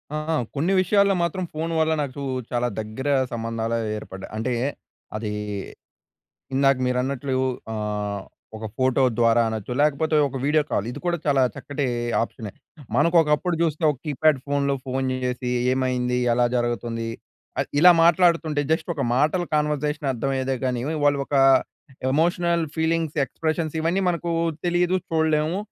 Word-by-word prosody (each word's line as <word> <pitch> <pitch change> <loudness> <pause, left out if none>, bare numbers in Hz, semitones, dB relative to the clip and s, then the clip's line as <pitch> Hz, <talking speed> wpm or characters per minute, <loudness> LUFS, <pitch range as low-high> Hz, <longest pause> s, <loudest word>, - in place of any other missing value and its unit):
ఆ! - - 0 0.2
ఆ! - - +2 0.2
కొన్ని 165 +7 +1
విషయాల్లో 200 +1 +3
మాత్రం 175 +2 -1
ఫోన్ 160 +2 -3
వల్ల 160 0 +2
నాకు 140 0 -6 0.3
చాలా 120 0 +1
దగ్గర 110 +6 -4 0.2
సంబంధాలే 115 0 -2 0.2
ఏర్పడ్డాయి. 95 -2 -9
అంటే 115 +3 -1 0.6
అదీ 110 -1 -3 1.2
ఇందాక 135 0 +4
మీరన్నట్లు 130 +1 -1 0.4
ఆహ్, 105 -2 -3 0.3
ఒక 110 0 -6
ఫోటో 130 +1 +2 0.2
ద్వారా 115 0 +4
అనొచ్చు 110 +1 -4
లేకపోతే 150 +1 +2
ఒక 135 - -7
వీడియో 150 +2 +3
కాల్. 100 - 0
ఇది - - -7
కూడా 175 0 +1
చాలా 140 -2 +3
చక్కటి 145 -1 -3 0.4
ఆప్షనె. 110 -3 -6 0.4
మనకు 165 +5 +3
ఒకప్పుడు 160 +3 0
చూస్తే 160 -1 0
ఒక 140 - -5
కీప్యాడ్ 150 0 +2
ఫోన్‌లో 140 0 +1
ఫోన్ 130 0 -1 0.2
చేసి, 125 0 -2 0.2
"ఏమైంది? 125 -1 0 0.2
ఎలా 120 0 +3
జరుగుతుంది?" 120 -1 -2 0.5
ఆహ్, - - -2
ఇలా 180 +2 +9
మాట్లాడుతుంటే 165 -3 +3
జస్ట్ 165 +2 -1
ఒక 140 - -1
మాటల 155 +6 +2
కన్వర్జేషన్ 150 -1 -1
అర్థమయ్యేదే 130 +1 -1
గాని 125 -2 -1 0.2
వాళ్ళు 145 -1 +3
ఒక - - -4 0.8
ఎమోషనల్ 170 +3 +2
ఫీలింగ్స్ 160 -1 0
ఎక్స్ప్రెషన్స్ 160 +2 -2
ఇవన్నీ 170 +4 +1
మనకు 170 0 -3 0.4
తెలీదు. 175 +1 +2
చూడలేము. 160 +1 +1
140 Hz, 140 wpm, -24 LUFS, 125-160 Hz, 1.2 s, ఇలా